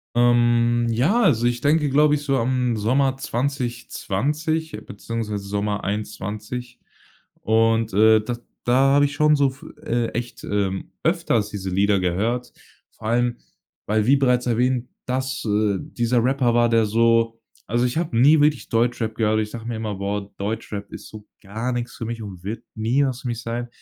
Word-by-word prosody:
Ähm, 120 0 +3
ja, 140 - +2
also 120 - +3
ich 120 0 0
denke, 150 0 +2
glaube 150 +2 +4
ich, 145 - -2
so 135 -2 0
am 125 0 0
Sommer 130 +5 +1
2020 140 +4 -2
beziehungsweise 105 -1 -5
Sommer 105 +1 -2
21 105 +4 -5 0.6
und, 115 0 +2
äh, 110 +2 +6
d 120 +3 -4 0.3
da 120 - +2 0.2
habe 145 0 +5
ich 140 - -6
schon 150 0 +4
so 140 -1 +3
fü 135 +2 -13
äh, 120 0 0
echt, 120 +1 -5
ähm, 100 -2 -2
öfters 160 - +1
diese 95 -2 -5
Lieder 100 +1 +2
gehört, 110 +8 -1 0.4
vor 110 - -8
allem 120 +1 +1 0.5
weil 105 0 +1
wie 140 +2 +5
bereits 125 -2 +2
erwähnt, 125 +1 +1 0.2
dass 130 0 -2
äh, 105 -2 +1
dieser 120 0 0
Rapper 130 -2 +2
war 120 0 +4
der 115 -1 +3
so 115 +1 +2 0.3
also 120 +3 0
ich 125 - -3
habe 165 -9 -2
nie 145 +6 +6
wirklich 150 -2 +1
Deutschrap 115 -1 0
gehört. 110 -1 +1
Ich 105 0 -3
sage 115 0 -8
mir 120 - -3
immer: 110 -1 -3
„Boah, 100 +1 -3
Deutschrap 105 -1 -4
ist - - -10
so 105 -1 -12 0.2
gar 110 +5 -4
nix 120 0 -4
für 115 - -5
mich 115 -1 -5
und 95 -4 -9
wird 105 +4 -5
nie 120 +6 +1
was 130 0 -4
für 125 - -4
mich 115 -1 -4
sein.“ 120 +1 -4
120 Hz, 175 wpm, -22 LUFS, 110-125 Hz, 0.6 s, äh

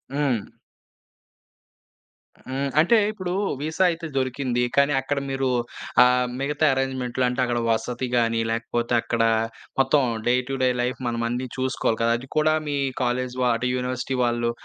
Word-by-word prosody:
హ్మ్. 135 -7 0 2.0
హ్మ్. 135 +2 -2
అంటే 175 +9 +5
ఇప్పుడు 185 -4 -4 0.3
వీసా 160 +4 0
అయితే 165 0 -5
దొరికింది. 130 -1 0
కానీ 140 +1 +4
అక్కడ 140 +1 -1
మీరు 135 -1 0 0.5
ఆహ్, 125 0 +3
మిగతా 150 +2 0
అరేంజ్మెంటులు 130 -1 -1
అంటే 125 +1 -1
అక్కడ 120 -1 -1
వసతి 120 +3 -1
గాని, 115 -1 +2
లేకపోతే 115 +1 -2
అక్కడ 120 0 -1 0.6
మొత్తం 135 +1 +4 0.2
డే 120 - +4
టు 135 - -2
డే 130 - +4
లైఫ్ 125 +1 -2
మనం 115 0 -1
అన్ని 125 +2 -2
చూసుకోవాలి 130 -3 0
కదా! 115 - +3
అది 130 +2 -12
కూడా 155 0 +4
మీ 145 -1 -1 0.3
కాలేజీ 125 +1 -1
వ - - +3
అంటే 125 +2 -1
యూనివర్సిటీ 125 +1 -2
వాళ్ళు, 120 -1 +1
130 Hz, 145 wpm, -24 LUFS, 120-140 Hz, 2.0 s, అంటే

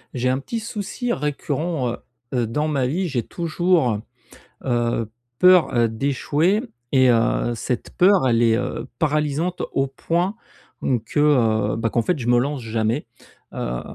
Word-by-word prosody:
J'ai 125 +1 0
un 130 +1 +1
petit 230 +11 -4
souci 225 +2 -3
récurrent, 150 0 -2
heu - - -5 0.4
heu, 120 -3 +1
dans 150 +7 -1
ma 140 -4 0
vie, 180 +8 -1
j'ai 135 -7 -1
toujours, 170 - +1 0.6
heu, 120 -3 0 0.3
peur, 180 -5 +6
heu, 120 -1 +3
d'échouer 145 - +1 0.3
et 130 -2 +5
heu, 120 0 +2
cette 120 +2 -3
peur, 185 -6 +4
elle 120 -1 +3
est, 115 -1 +4
heu, 125 +2 -3
paralysante 150 +3 0
au 135 0 +1
point, 170 +8 -1 0.5
hem, 125 -4 +1
que, 115 +6 -3 0.5
heu, - - -1
ben 115 0 0
qu'en 115 +1 0
fait 165 +5 0
je 120 - -4
me 120 0 +4
lance 140 +2 -2
jamais. 115 +3 -1 0.5
Heu - - -3
135 Hz, 160 wpm, -22 LUFS, 120-165 Hz, 0.6 s, peur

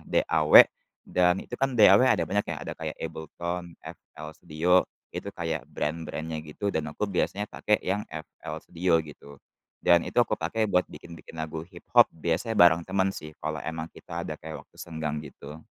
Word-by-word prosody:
DAW, - - +6 0.4
Dan 90 +1 +3
itu 120 - -7
kan 135 0 0
DAW 105 -1 +7
ada 90 - +3
banyak 105 +1 +1
ya, - - -4
ada - - -5
kayak - - -4
AbleTone, 85 +2 -5
FL 75 0 -11
Studio, 90 +4 +2 0.2
itu 100 - -6
kayak 80 -4 -3
brand-brand-nya 80 +1 -4
gitu. 80 +7 -4
Dan 80 -6 -1
aku 105 - -2
biasanya 100 +2 -1
pakai 105 - 0
yang 100 +3 -2
FL 80 +1 -7
Studio 85 -1 +1
gitu. 70 -2 -12 0.4
Dan 85 -1 +4
itu 120 - +1
aku 110 -2 +1
pakai 110 +6 -1
buat 90 -2 +3
bikin-bikin 85 -1 -11
lagu 80 0 -5
hiphop 85 0 +3
biasanya 85 +7 -2
bareng 85 -1 +6
teman 95 0 +1
sih, 80 -5 -7
kalau 80 0 -3
emang 80 0 -4
kita - - -8
ada - - -5
kayak 80 0 -8
waktu - - -23
senggang 80 -2 -4
gitu. 75 +2 -11
85 Hz, 170 wpm, -27 LUFS, 80-95 Hz, 0.4 s, DAW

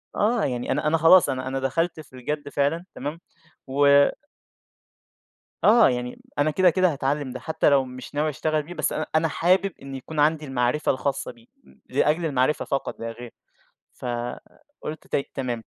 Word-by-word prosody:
آه، 220 +2 +2
يعني 125 -2 -2
أنا 150 +2 0
أنا 165 - +3
خلاص، 165 +1 +6
أنا 130 -1 -3
أنا 135 +1 -2
دخلت 160 +6 -1
في 145 -4 -13
الجَدّ 145 +4 -4
فعلًا 145 +5 0
تمام، 150 +5 -5 0.5
و 140 +1 +5 1.5
آه، 225 - +7
يعني 125 0 -4 0.2
أنا 150 +1 +3
كده، 185 +2 +4
كده 185 0 +2
هاتعلّم 140 0 -2
ده، 130 - -6
حتى 160 -2 +1
لو 135 -2 +3
مش 130 +2 -10
ناوي 150 +2 +1
أشتغل 155 +1 -1
بيه، 170 +4 -9
بس 155 -3 -1
أنا 155 - -2
أنا 160 +1 +3
حابب 185 +4 +2
إن 135 0 -8
يكون 150 +4 -6
عندي 155 +1 +2
المعرفة 130 +2 +1
الخاصة 140 +1 -2
بيه، 115 -1 -21 0.2
ل 65 0 -22
لأجل 160 +3 +1
المعرفة 135 0 +1
فقط 135 - -3
لا 115 0 -4
غير، 120 0 -10 0.6
فقُلت 125 - -7
طيب 140 - -1
تمام، 125 -4 -3
145 Hz, 170 wpm, -24 LUFS, 130-160 Hz, 1.5 s, آه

